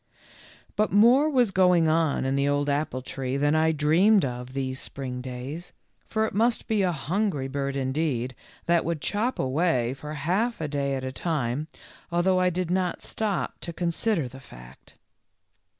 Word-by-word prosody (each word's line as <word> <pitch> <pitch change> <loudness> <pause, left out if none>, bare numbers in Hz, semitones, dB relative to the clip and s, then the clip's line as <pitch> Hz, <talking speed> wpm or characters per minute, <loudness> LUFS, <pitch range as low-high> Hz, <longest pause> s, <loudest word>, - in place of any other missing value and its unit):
But 215 +1 +1
more 245 +9 +5
was 250 -7 +3
going 180 -3 +4
on 155 -4 +1
in 135 +1 0
the 140 0 +1
old 145 0 +1
apple 140 -3 -1
tree 135 0 -3
than 145 +1 +2
I 160 +1 +3
dreamed 165 +7 +4
of 125 0 -6
these 130 -1 -2
spring 125 -2 -5
days, 130 +7 -7 0.3
for 220 0 0
it - - -4
must 230 +4 +1
be 215 -2 +1
a 185 -2 +2
hungry 165 -1 -1
bird 140 0 -3
indeed 130 -2 -1 0.3
that 170 -1 +3
would 165 -1 -2
chop 215 - -1
away 130 -3 +1
for 150 +3 -7
half 190 +11 0
a 155 - -2
day 140 -1 -1
at 130 - -4
a 130 - -3
time, 145 -2 -2 0.4
although 185 +2 +2
I 185 0 +3
did 180 0 -2
not 180 -1 -1
stop 210 -4 -2
to 170 - -5
consider 170 - 0
the 130 +2 -11
fact. - - -15
155 Hz, 170 wpm, -26 LUFS, 135-185 Hz, 0.4 s, more